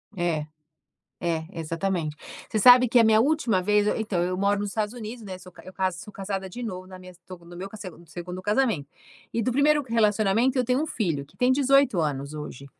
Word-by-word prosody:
É. 170 Hz, -4 st, -1 dB, 0.8 s
É, 165 Hz, -2 st, -1 dB
exatamente. 165 Hz, -1 st, -2 dB, 0.3 s
Você 215 Hz, -, 0 dB
sabe 250 Hz, +3 st, +8 dB
que 245 Hz, -, +5 dB
a -, -, +6 dB
minha 220 Hz, 0 st, +5 dB
última 255 Hz, -8 st, +1 dB
vez 210 Hz, +2 st, +2 dB
eu -, -, +1 dB
Eh, -, -, -2 dB
então 200 Hz, -5 st, -1 dB
eu 180 Hz, +1 st, -1 dB
moro 200 Hz, +1 st, +1 dB
nos 205 Hz, 0 st, -2 dB
Estados 215 Hz, 0 st, -2 dB
Unidos, 230 Hz, 0 st, -8 dB
né? 190 Hz, -3 st, -7 dB
Sou 180 Hz, -1 st, -14 dB
ca -, -, -15 dB
eu 185 Hz, -, -10 dB
ca 190 Hz, 0 st, 0 dB
sou 180 Hz, +4 st, -10 dB
casada 195 Hz, -1 st, -5 dB
de 245 Hz, +7 st, -8 dB
novo 185 Hz, -6 st, -5 dB
na 185 Hz, 0 st, -11 dB
minha 185 Hz, 0 st, -12 dB
estou 180 Hz, 0 st, -13 dB
no 170 Hz, 0 st, -13 dB
meu 190 Hz, +3 st, -6 dB
segun 180 Hz, -4 st, -10 dB
2º 180 Hz, +3 st, -7 dB
casamento. 210 Hz, -, 0 dB, 0.4 s
E 230 Hz, -, 0 dB
do 230 Hz, -, 0 dB
1º 295 Hz, +2 st, +3 dB
relacionamento, 225 Hz, +2 st, +2 dB
eu 250 Hz, -, +2 dB
tenho 250 Hz, +3 st, +1 dB
um -, -, 0 dB
filho, 165 Hz, -, -2 dB
que 140 Hz, -, -25 dB
tem 250 Hz, -, +2 dB
18 275 Hz, -4 st, +3 dB
anos 140 Hz, -1 st, -3 dB
hoje. 150 Hz, -3 st, -8 dB
195 Hz, 225 wpm, -25 LUFS, 175-230 Hz, 0.8 s, sabe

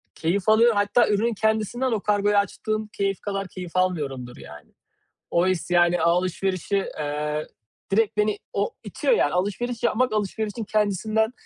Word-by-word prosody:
keyif 185 Hz, +5 st, 0 dB
alıyorum. 225 Hz, +1 st, +5 dB
Hatta 205 Hz, +4 st, +3 dB
ürünün 220 Hz, +3 st, +1 dB
kendisinden 220 Hz, +4 st, 0 dB
o 220 Hz, -, +1 dB
kargoyu 205 Hz, 0 st, +2 dB
açtığım 215 Hz, +2 st, -1 dB
keyif 195 Hz, -2 st, -2 dB
kadar 195 Hz, -1 st, -3 dB
keyif 180 Hz, -2 st, -8 dB
almıyorumdur 140 Hz, -9 st, -1 dB
yani. 75 Hz, 0 st, -13 dB, 0.6 s
O 170 Hz, +2 st, +2 dB
his, 185 Hz, -1 st, -1 dB
yani, 175 Hz, 0 st, +4 dB
alışverişi, 185 Hz, +2 st, 0 dB, 0.2 s
eee, 150 Hz, +1 st, -2 dB, 0.5 s
direkt 215 Hz, 0 st, +2 dB
beni 210 Hz, 0 st, +1 dB
o -, -, 0 dB
itiyor -, -, +1 dB
yani -, -, +2 dB
alışveriş 215 Hz, +6 st, -2 dB
yapmak 245 Hz, 0 st, +1 dB
alışverişin 215 Hz, +1 st, -2 dB
kendisinden 215 Hz, +2 st, 0 dB
205 Hz, 140 wpm, -24 LUFS, 180-220 Hz, 0.6 s, alıyorum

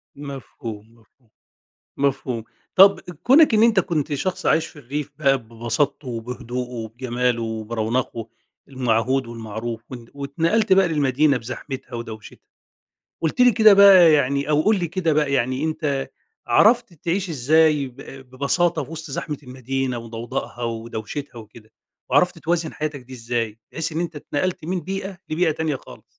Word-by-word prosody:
مفهوم، 130 Hz, -6 st, -8 dB
مفهوم، 115 Hz, +1 st, -31 dB, 0.7 s
مفهوم. 130 Hz, -4 st, -1 dB, 0.3 s
طب 195 Hz, +1 st, +7 dB
كونك 250 Hz, -, +4 dB
إن 215 Hz, -, +4 dB
أنتَ 230 Hz, -4 st, +5 dB
كنت 155 Hz, -3 st, -2 dB
شخص 185 Hz, +7 st, -3 dB
عايش 160 Hz, 0 st, +3 dB
في -, -, -14 dB
الريف 145 Hz, +2 st, -5 dB
بقى 135 Hz, -3 st, +3 dB
ببساطته 120 Hz, +5 st, -2 dB
وبهدوءه 125 Hz, +1 st, -5 dB
وبجماله 120 Hz, +1 st, -2 dB
وبرونقه 115 Hz, +1 st, -3 dB, 0.4 s
المعهود 130 Hz, 0 st, 0 dB
والمعروف، 115 Hz, 0 st, -6 dB
وانت 120 Hz, -3 st, -9 dB
واتنقلت 165 Hz, +10 st, 0 dB
بقي 190 Hz, -2 st, +5 dB
للمدينة 145 Hz, -1 st, +2 dB
بزحمتها 130 Hz, +2 st, -7 dB
ودوشتها، 110 Hz, -2 st, -8 dB, 0.8 s
قلت 160 Hz, +9 st, -1 dB
لي 250 Hz, -1 st, +7 dB
كده 220 Hz, -1 st, +7 dB
بقى 190 Hz, -5 st, +8 dB
يعني 140 Hz, 0 st, +1 dB
أو 150 Hz, +1 st, +3 dB
قل 215 Hz, -1 st, +3 dB
لي 175 Hz, -, -1 dB
كده 170 Hz, -2 st, 0 dB
بقى 150 Hz, -2 st, +1 dB
يعني، 130 Hz, +2 st, 0 dB
أنتَ 155 Hz, -4 st, -2 dB, 0.4 s
عرفت 235 Hz, -1 st, +4 dB
تعيش 175 Hz, +4 st, -2 dB
إزاي 150 Hz, +1 st, +3 dB
ب 125 Hz, -, -19 dB, 0.3 s
ببساطة 150 Hz, +7 st, +1 dB
في 140 Hz, -, -15 dB
وسط 160 Hz, -1 st, -6 dB
زحمة 145 Hz, +1 st, -4 dB
المدينة 130 Hz, -1 st, -3 dB
وضوضاءها 115 Hz, +2 st, -6 dB
ودوشتها 115 Hz, +3 st, -5 dB
وكده؟ 110 Hz, 0 st, -14 dB, 0.4 s
وعرفت 165 Hz, +6 st, +3 dB
توازن 165 Hz, 0 st, -1 dB
حياتك 150 Hz, -2 st, -4 dB
دي 130 Hz, +1 st, -15 dB
إزاي؟ 115 Hz, -2 st, -3 dB
بحيث 165 Hz, 0 st, -3 dB
إن 160 Hz, -, -2 dB
أنتَ 170 Hz, -2 st, -4 dB
أتنقلت 155 Hz, +4 st, -3 dB
من 180 Hz, +2 st, -2 dB
بيئة 195 Hz, +2 st, -5 dB
لبيئة 165 Hz, +1 st, +2 dB
تانية 155 Hz, -2 st, -1 dB
خالص. -, -, -14 dB
140 Hz, 145 wpm, -22 LUFS, 120-165 Hz, 0.8 s, بقى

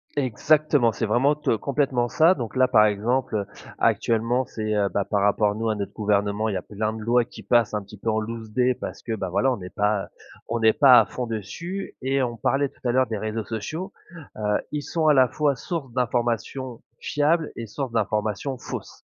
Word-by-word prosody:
Exactement, 145 Hz, 0 st, +2 dB
c'est 110 Hz, +2 st, -2 dB
vraiment, 130 Hz, +7 st, +2 dB
te 150 Hz, -6 st, 0 dB
complètement 135 Hz, -1 st, 0 dB
ça 160 Hz, +8 st, +4 dB
donc 120 Hz, -4 st, -6 dB
là, 130 Hz, 0 st, +4 dB
par 110 Hz, -2 st, +5 dB
exemple, 110 Hz, +4 st, 0 dB
heu, 100 Hz, -2 st, -1 dB, 0.3 s
actuellement, 115 Hz, +3 st, +1 dB
c'est, 110 Hz, -2 st, -3 dB
heu, 100 Hz, -1 st, +2 dB
bah, 100 Hz, -, -1 dB
par 100 Hz, -2 st, 0 dB
rapport 105 Hz, +1 st, +2 dB
nous 110 Hz, +1 st, -2 dB
à 110 Hz, -, 0 dB
notre 100 Hz, -1 st, -5 dB
gouvernement, 105 Hz, +1 st, 0 dB
il -, -, -2 dB
y -, -, +1 dB
a 90 Hz, -, -3 dB
plein 110 Hz, +1 st, -3 dB
de 110 Hz, -, -7 dB
lois 120 Hz, +2 st, +3 dB
qui 110 Hz, -3 st, -12 dB
passent 115 Hz, +1 st, +2 dB
un 105 Hz, -, -2 dB
petit 100 Hz, +2 st, -13 dB
peu 110 Hz, +3 st, -3 dB
en 110 Hz, -, +1 dB
loucedé, 115 Hz, +3 st, -1 dB
parce -, -, -8 dB
que, 115 Hz, -, -3 dB
bah, 95 Hz, -4 st, -3 dB
voilà, 100 Hz, +9 st, +2 dB
on 115 Hz, -7 st, -3 dB
est 90 Hz, -, -7 dB
pas 105 Hz, -1 st, 0 dB, 0.4 s
on 115 Hz, 0 st, -2 dB
est 110 Hz, 0 st, +6 dB
pas 130 Hz, -4 st, +8 dB
à 105 Hz, -, -1 dB
fond 125 Hz, -2 st, -5 dB
dessus 170 Hz, -, -5 dB
et 135 Hz, +1 st, +1 dB
on 120 Hz, -2 st, -2 dB
parlait 140 Hz, +5 st, +1 dB
tout -, -, -28 dB
à -, -, +3 dB
l'heure 130 Hz, +1 st, +3 dB
des 110 Hz, -1 st, -3 dB
réseaux 110 Hz, +1 st, -3 dB
sociaux, 155 Hz, -, -5 dB, 0.5 s
heu, 105 Hz, -1 st, +1 dB
ils 150 Hz, -1 st, -2 dB
sont 160 Hz, +1 st, -1 dB
à 150 Hz, -, +7 dB
la 130 Hz, -2 st, +5 dB
fois 145 Hz, 0 st, 0 dB
source 145 Hz, -3 st, -5 dB
d'informations 120 Hz, 0 st, -2 dB, 0.2 s
fiables 155 Hz, +2 st, +1 dB
et 115 Hz, -1 st, -6 dB
source 135 Hz, +3 st, -4 dB
d'informations 110 Hz, +3 st, -1 dB
fausses. -, -, -8 dB
115 Hz, 215 wpm, -24 LUFS, 105-130 Hz, 0.5 s, pas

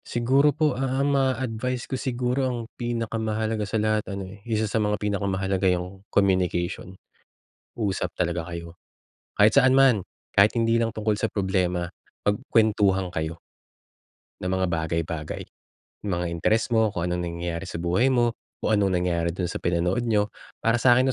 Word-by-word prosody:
Siguro 130 Hz, +5 st, +3 dB
po 150 Hz, +1 st, +1 dB
ang 135 Hz, +2 st, 0 dB
ma-a-advice 130 Hz, -2 st, 0 dB
ko -, -, -8 dB
siguro 125 Hz, 0 st, -1 dB
ang 125 Hz, -, -2 dB, 0.2 s
pinakamahalaga 110 Hz, -2 st, -2 dB
sa 110 Hz, -, 0 dB
lahat 110 Hz, 0 st, +1 dB
ano 95 Hz, -1 st, -5 dB
eh, 100 Hz, -, -15 dB
isa 110 Hz, -1 st, +1 dB
sa 110 Hz, +1 st, 0 dB
mga 105 Hz, 0 st, +1 dB
pinakamahalaga 95 Hz, -2 st, 0 dB
'yung 90 Hz, +2 st, -2 dB
communication, 95 Hz, -1 st, 0 dB, 0.8 s
usap 100 Hz, -5 st, -1 dB
talaga 85 Hz, 0 st, -1 dB
kayo. 85 Hz, -1 st, -7 dB, 0.6 s
Kahit 105 Hz, +1 st, +6 dB
saan 130 Hz, 0 st, +5 dB
man, 130 Hz, -8 st, +4 dB, 0.2 s
kahit 100 Hz, +3 st, +4 dB
hindi 115 Hz, 0 st, +2 dB
lang 115 Hz, -1 st, -1 dB
tungkol 105 Hz, -1 st, 0 dB
sa 115 Hz, -, +1 dB
problema, 90 Hz, -4 st, -1 dB, 0.3 s
magkuwentuhan 105 Hz, -3 st, +2 dB
kayo. 80 Hz, 0 st, -4 dB, 1.0 s
Ng 90 Hz, -, -2 dB
mga 95 Hz, 0 st, +1 dB
bagay 80 Hz, 0 st, 0 dB
bagay, 75 Hz, -3 st, -5 dB, 0.7 s
mga 90 Hz, -2 st, -1 dB
interes 110 Hz, +8 st, +1 dB
mo, 110 Hz, -1 st, +4 dB
kung 90 Hz, -5 st, -3 dB
anong 90 Hz, 0 st, -1 dB
nangyayari 85 Hz, +1 st, -4 dB
sa -, -, -5 dB
buhay 90 Hz, +9 st, +2 dB
mo, 120 Hz, -3 st, +2 dB, 0.3 s
kung -, -, 0 dB
anong 100 Hz, -3 st, +3 dB
nangyari 85 Hz, -1 st, 0 dB
dun 90 Hz, +1 st, -2 dB
sa -, -, -4 dB
pinanood 90 Hz, +5 st, 0 dB
niyo. 105 Hz, -2 st, +1 dB, 0.3 s
Para 115 Hz, +1 st, +3 dB
sa'kin 125 Hz, +1 st, +5 dB
105 Hz, 155 wpm, -25 LUFS, 90-115 Hz, 1.0 s, Kahit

